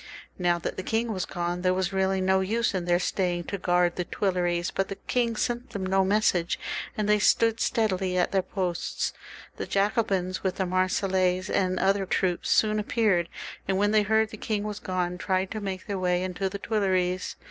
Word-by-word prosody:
Now 175 Hz, -1 st, +2 dB
that 170 Hz, -, -4 dB
the -, -, -2 dB
king 225 Hz, +3 st, -1 dB
was 185 Hz, -2 st, -3 dB
gone, 175 Hz, 0 st, -3 dB
there 185 Hz, 0 st, +2 dB
was 190 Hz, +1 st, -1 dB
really 190 Hz, 0 st, +1 dB
no 190 Hz, 0 st, +3 dB
use 220 Hz, +4 st, 0 dB
in 185 Hz, -2 st, -2 dB
their 175 Hz, 0 st, +3 dB
staying 180 Hz, -1 st, -1 dB
to 200 Hz, +3 st, -5 dB
guard 175 Hz, -1 st, +2 dB
the 180 Hz, -, 0 dB
Tmleries, 175 Hz, -2 st, 0 dB
but 195 Hz, -, 0 dB
the 195 Hz, -, -5 dB
king 235 Hz, +2 st, -1 dB
sent 240 Hz, +2 st, -2 dB
them 195 Hz, -2 st, -4 dB
no 190 Hz, +1 st, +3 dB
message, 190 Hz, -4 st, +2 dB, 0.4 s
and 210 Hz, -1 st, 0 dB
they 210 Hz, 0 st, +4 dB
stood 225 Hz, +2 st, +3 dB
steadily 190 Hz, -7 st, 0 dB
at 180 Hz, -, +2 dB
their 195 Hz, -, +2 dB
posts. 180 Hz, -2 st, -2 dB, 0.4 s
The -, -, -4 dB
Jacobins, 195 Hz, -3 st, 0 dB
with 190 Hz, -1 st, -1 dB
the 190 Hz, -, -1 dB
Marseillese 185 Hz, 0 st, +1 dB
and 185 Hz, -1 st, +1 dB
other 195 Hz, 0 st, +2 dB
troops, 180 Hz, -1 st, 0 dB
soon 215 Hz, -1 st, +3 dB
ap 210 Hz, -, -4 dB
peared, 190 Hz, -7 st, +2 dB, 0.4 s
and 190 Hz, 0 st, +1 dB
when 205 Hz, +1 st, +2 dB
they 215 Hz, 0 st, +5 dB
heard 220 Hz, +1 st, +2 dB
the 215 Hz, -, -8 dB
king 210 Hz, -1 st, -2 dB
was 210 Hz, -1 st, -4 dB
gone, 180 Hz, -1 st, -2 dB
tried 185 Hz, +1 st, 0 dB
to 215 Hz, -, -4 dB
make 190 Hz, -2 st, -4 dB
their 200 Hz, -2 st, -3 dB
way 180 Hz, 0 st, +1 dB
into 185 Hz, +1 st, -2 dB
the 200 Hz, -, -5 dB
Tmleries. 185 Hz, -4 st, 0 dB
190 Hz, 200 wpm, -27 LUFS, 180-205 Hz, 0.4 s, they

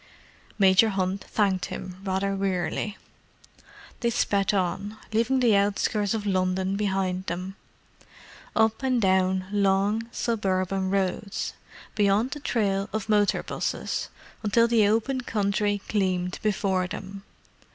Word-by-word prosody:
Major 195 Hz, +2 st, +5 dB
Hunt 190 Hz, -1 st, -1 dB
thanked 195 Hz, -4 st, +1 dB
him, 185 Hz, 0 st, -7 dB
rather 195 Hz, 0 st, -1 dB
wearily. 195 Hz, +2 st, -2 dB, 1.0 s
They 235 Hz, -, +1 dB
sped 200 Hz, -3 st, +1 dB
on, 195 Hz, +2 st, -1 dB, 0.2 s
leaving 240 Hz, +4 st, +2 dB
the 230 Hz, -4 st, +5 dB
outskirts 205 Hz, +1 st, +1 dB
of 210 Hz, -2 st, -3 dB
London 185 Hz, 0 st, 0 dB
behind 190 Hz, -2 st, -1 dB
them. 185 Hz, +3 st, -4 dB, 1.0 s
Up 220 Hz, +1 st, +2 dB
and 260 Hz, -2 st, +1 dB
down 190 Hz, -2 st, +2 dB
long, 205 Hz, +3 st, +1 dB
suburban 190 Hz, -5 st, -1 dB
roads, 195 Hz, +1 st, -1 dB, 0.4 s
beyond 210 Hz, +4 st, +2 dB
the 295 Hz, -, -5 dB
trail 200 Hz, -7 st, 0 dB
of 215 Hz, +1 st, -4 dB
motor 210 Hz, -1 st, +3 dB
'buses, -, -, -3 dB, 0.3 s
until 230 Hz, +2 st, +3 dB
the 225 Hz, -3 st, +4 dB
open 230 Hz, +5 st, +1 dB
country 205 Hz, -2 st, 0 dB
gleamed 185 Hz, -3 st, 0 dB
before 190 Hz, -3 st, 0 dB
them. 195 Hz, +1 st, -7 dB
200 Hz, 120 wpm, -26 LUFS, 190-215 Hz, 1.0 s, Major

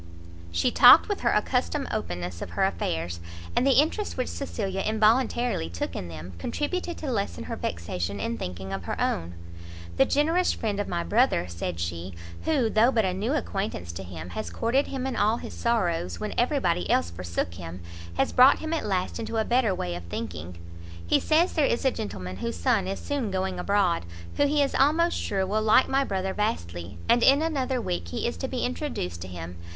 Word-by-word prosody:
She 85 Hz, 0 st, +1 dB
talked -, -, +8 dB
with -, -, -2 dB
her -, -, +2 dB
accustomed 85 Hz, -, 0 dB
openness 90 Hz, 0 st, -4 dB
of -, -, -5 dB
her -, -, +4 dB
affairs, 85 Hz, -2 st, -2 dB, 0.4 s
and 255 Hz, -, +3 dB
the 270 Hz, -, +6 dB
interest 330 Hz, +8 st, 0 dB
which 255 Hz, -, -1 dB
Cecilia 195 Hz, -8 st, -3 dB
involuntarily 220 Hz, -, +2 dB
took 85 Hz, 0 st, -4 dB
in 90 Hz, -, -4 dB
them, 85 Hz, +2 st, -8 dB
contributed 345 Hz, -, -2 dB
to 290 Hz, -4 st, -3 dB
lessen 85 Hz, -, -2 dB
her -, -, -5 dB
vexation 85 Hz, +3 st, -3 dB
in 80 Hz, -, -2 dB
thinking 90 Hz, +4 st, -5 dB
of 95 Hz, -3 st, -4 dB
her -, -, -3 dB
own. 85 Hz, +1 st, -1 dB, 0.6 s
"The -, -, +6 dB
generous 325 Hz, +5 st, +2 dB
friend 210 Hz, -3 st, -2 dB
of 205 Hz, -, -1 dB
my 85 Hz, -, -1 dB
brother," 85 Hz, +1 st, +2 dB
said 85 Hz, 0 st, -4 dB
she, 85 Hz, +1 st, -4 dB, 0.3 s
"who, 285 Hz, -7 st, +2 dB
though 220 Hz, +3 st, +4 dB
but 225 Hz, -5 st, +2 dB
a 185 Hz, -, 0 dB
new 210 Hz, +8 st, -1 dB
acquaintance 195 Hz, -, -3 dB
to 85 Hz, +3 st, -7 dB
him, 90 Hz, -2 st, -8 dB
has 85 Hz, -, -4 dB
courted 235 Hz, -, +1 dB
him 265 Hz, -1 st, -4 dB
in 265 Hz, -, -2 dB
all 215 Hz, +3 st, +2 dB
his -, -, -8 dB
sorrows, 170 Hz, -, 0 dB
when -, -, -3 dB
every -, -, +2 dB
body 90 Hz, -1 st, 0 dB
else 85 Hz, 0 st, +2 dB
forsook 85 Hz, -1 st, -3 dB
him, 85 Hz, +1 st, -8 dB, 0.4 s
has -, -, +2 dB
brought 255 Hz, +2 st, +7 dB
him 315 Hz, +1 st, -4 dB
at 315 Hz, -9 st, -1 dB
last 185 Hz, +2 st, -1 dB
into 225 Hz, 0 st, -3 dB
a 220 Hz, -, +1 dB
better 240 Hz, -5 st, +2 dB
way 90 Hz, -, -3 dB
of 85 Hz, 0 st, -6 dB
thinking. 85 Hz, 0 st, -6 dB, 0.5 s
He -, -, +3 dB
says 330 Hz, +4 st, +2 dB
there 310 Hz, -, +2 dB
is 235 Hz, -, 0 dB
a 265 Hz, -, +5 dB
gentleman 95 Hz, -, -5 dB
whose 235 Hz, -, -3 dB
son 225 Hz, -8 st, +1 dB
is 195 Hz, -, -3 dB
soon 280 Hz, -7 st, -2 dB
going 190 Hz, -1 st, -2 dB
abroad, 185 Hz, -, +1 dB, 0.3 s
who 285 Hz, -, +4 dB
he 290 Hz, 0 st, +3 dB
is 275 Hz, -, -1 dB
almost 325 Hz, +5 st, +3 dB
sure 195 Hz, -1 st, -1 dB
will 210 Hz, +3 st, 0 dB
like 220 Hz, +4 st, +5 dB
my 270 Hz, +1 st, +2 dB
brother 190 Hz, -5 st, -2 dB
vastly, 85 Hz, -, -3 dB
and 235 Hz, +1 st, +4 dB
in 275 Hz, +5 st, +5 dB
another 270 Hz, -5 st, 0 dB
week, 85 Hz, -, -3 dB
he 85 Hz, -, -3 dB
is -, -, -1 dB
to -, -, -3 dB
be -, -, -2 dB
introduced 85 Hz, +1 st, -3 dB
to 95 Hz, -, -6 dB
him. 90 Hz, -1 st, -7 dB
190 Hz, 205 wpm, -26 LUFS, -, 0.6 s, talked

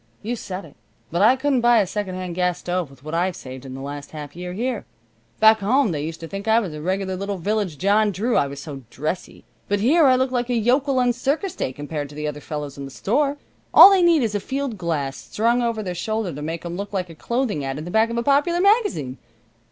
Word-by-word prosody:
"You 235 Hz, +4 st, -2 dB
said 195 Hz, -4 st, -6 dB
it. -, -, -16 dB, 0.4 s
But 170 Hz, -, 0 dB
I 225 Hz, +5 st, +6 dB
couldn't 265 Hz, -1 st, +1 dB
buy 240 Hz, 0 st, +5 dB
a 205 Hz, -, +3 dB
secondhand 185 Hz, -2 st, -4 dB
gas 180 Hz, 0 st, 0 dB
stove 180 Hz, -3 st, -2 dB
with 135 Hz, -1 st, -18 dB
what 155 Hz, +1 st, -7 dB
I've 175 Hz, +1 st, 0 dB
saved 130 Hz, +1 st, -9 dB
in 130 Hz, -, -7 dB
the 135 Hz, -, -7 dB
last 145 Hz, +1 st, -7 dB
half 150 Hz, -2 st, -8 dB
year 180 Hz, +1 st, -6 dB
here. 235 Hz, +3 st, -2 dB, 0.6 s
Back 220 Hz, 0 st, +6 dB
home 235 Hz, +3 st, +2 dB
they 145 Hz, -3 st, -2 dB
used 160 Hz, +1 st, -5 dB
to 165 Hz, -, -6 dB
think 195 Hz, +4 st, -6 dB
I 220 Hz, +1 st, +5 dB
was 190 Hz, -9 st, -4 dB
a 150 Hz, -, -7 dB
regular 190 Hz, +2 st, -1 dB
little 200 Hz, +1 st, -3 dB
village 200 Hz, -3 st, -1 dB
John 205 Hz, +4 st, +3 dB
Drew, 220 Hz, +6 st, -1 dB
I 140 Hz, -, +3 dB
was 140 Hz, 0 st, -8 dB
so 140 Hz, -2 st, -8 dB
dressy. 155 Hz, +8 st, -5 dB, 0.2 s
But 205 Hz, 0 st, 0 dB
here 290 Hz, +8 st, +5 dB
I 260 Hz, -, +6 dB
look 260 Hz, 0 st, +1 dB
like 245 Hz, -1 st, -1 dB
a 245 Hz, -, +1 dB
yokel 260 Hz, +4 st, +2 dB
on 245 Hz, -1 st, +3 dB
circus 290 Hz, -, -1 dB
day -, -, -2 dB
compared 145 Hz, +1 st, -5 dB
to 145 Hz, -, -12 dB
the 150 Hz, 0 st, -3 dB
other 150 Hz, 0 st, -5 dB
fellows 145 Hz, -2 st, -6 dB
in 140 Hz, -, -5 dB
the -, -, -8 dB
store. 280 Hz, -, 0 dB, 0.4 s
All 395 Hz, -, +11 dB
they 385 Hz, -2 st, +4 dB
need 335 Hz, -5 st, +4 dB
is 220 Hz, -2 st, -1 dB
a 205 Hz, -, 0 dB
field 270 Hz, +3 st, -3 dB
glass 155 Hz, -7 st, -2 dB
strung 235 Hz, +3 st, 0 dB
over 230 Hz, -2 st, -1 dB
their 180 Hz, -2 st, -3 dB
shoulder 215 Hz, +1 st, -2 dB
to 145 Hz, -, -7 dB
make 160 Hz, +2 st, -4 dB
them 170 Hz, 0 st, -5 dB
look 200 Hz, +1 st, -5 dB
like 185 Hz, -3 st, -2 dB
a -, -, -10 dB
clothing 235 Hz, -, -2 dB
ad 135 Hz, 0 st, -3 dB
in 155 Hz, -, -6 dB
the 175 Hz, -, -6 dB
back 220 Hz, +3 st, +3 dB
of 235 Hz, -, -3 dB
a 235 Hz, -, 0 dB
popular 290 Hz, +6 st, +2 dB
magazine. 395 Hz, -, +2 dB
195 Hz, 255 wpm, -22 LUFS, 155-240 Hz, 0.6 s, All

